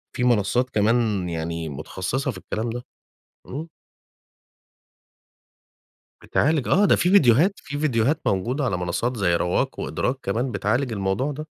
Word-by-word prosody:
في 125 - -1
منصات 120 +2 +2
كمان 105 -4 +1
يعني 80 -1 -3
متخصصة 95 - -3
في 95 - -10
الكلام 110 +4 -4
ده، 120 +1 -5 0.6
إمم. 155 +5 -6 2.5
بتعالج 150 -3 +1
آه، 200 +3 +4
ده - - +5
في 175 - +1
ڤيديوهات 160 - +5
في 145 - -7
ڤيديوهات 140 -1 +1
موجودة 120 +10 0
على 100 -9 0
منصات 95 +8 -2
زي 90 -4 +2
Rwaq 90 0 +1
وEdrak 125 - -1
كمان، 120 +6 -1
بتعالج 115 +5 0
الموضوع 100 +8 -1
ده. 155 +2 -7
120 Hz, 135 wpm, -23 LUFS, 95-135 Hz, 2.5 s, ده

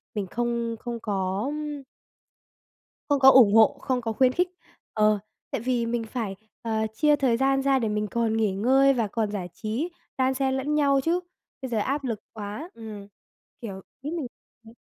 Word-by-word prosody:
mình 205 -3 -2
không 235 +2 -2
không 235 0 -5
có, 195 -2 -1
ưm 300 -1 -5 1.3
Không 285 -1 +3
có 265 0 +9
ủng 240 -6 +7
hộ, 220 0 +6
không 255 -1 0
có 225 -1 -2
khuyến 255 +2 +4
khích. 360 +4 +2 0.5
Ờ, 215 -1 +3 0.3
tại - - -2
vì 245 -1 0
mình 230 0 -1
phải, 220 -3 -4 0.3
ờ, 220 -1 -1
chia 300 +6 +4
thời 260 -5 +2
gian 270 +1 +2
ra 270 -1 +3
để 225 -3 -1
mình 210 0 -1
còn 230 -1 +1
nghỉ 215 -3 +2
ngơi 265 +7 +4
và 235 -4 0
còn 215 0 -2
giải 185 -4 -4
trí, 230 - -3 0.3
đan 260 0 +2
xen 265 0 0
lẫn 290 +3 -1
nhau 280 -2 +3
chứ, 340 +4 +2 0.4
bây 260 - -4
giờ 235 - -1
áp 275 +7 -1
lực 230 -5 -2
quá, 215 - -6
ừm, 215 -3 -9 0.5
kiểu, 195 -5 -6 0.2
ý 290 +3 -4
mình 290 -6 -3 0.4
ừm. 225 - -14
235 Hz, 190 wpm, -26 LUFS, 215-270 Hz, 1.3 s, có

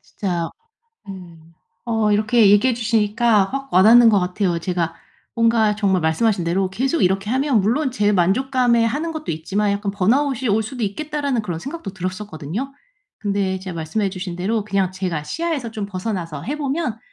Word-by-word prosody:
진짜 175 -4 -3 0.6
음 170 -4 -11 0.3
어 225 -2 +1
이렇게 215 0 +4
얘기해 220 +5 +4
주시니까 225 -1 +2
확 275 +6 -6
와닿는 225 +6 +7
것 210 -2 +4
같아요. 180 -1 -1
제가 170 -2 -2 0.4
뭔가 230 -2 +3
정말 195 -3 +1
말씀하신 180 +5 +1
대로 185 +3 0
계속 265 - -1
이렇게 195 +3 +1
하면 265 -3 +2
물론 255 +7 0
제 210 -4 +1
만족감에 235 +5 +2
하는 300 +8 -1
것도 310 -1 -5
있지만 195 +6 -1
'약간 200 0 -2
번아웃이 250 +5 +1
올 215 +2 +2
수도 245 +3 -6
있겠다.'라는 280 +3 -2
그런 175 -5 -4
생각도 275 - -7
들었었거든요. 185 - -5 0.4
근데 200 -2 -1
이제 190 0 -6
말씀해 170 +5 -2
주신 185 -2 -6
대로 205 +5 -1
그냥 195 -3 0
제가 185 -5 -3
시야에서 290 - -3
좀 215 -3 -5
벗어나서 185 -6 -4
해 290 - -4
보면 280 -5 -2
210 Hz, 375 characters per minute, -21 LUFS, 185-240 Hz, 0.6 s, 와닿는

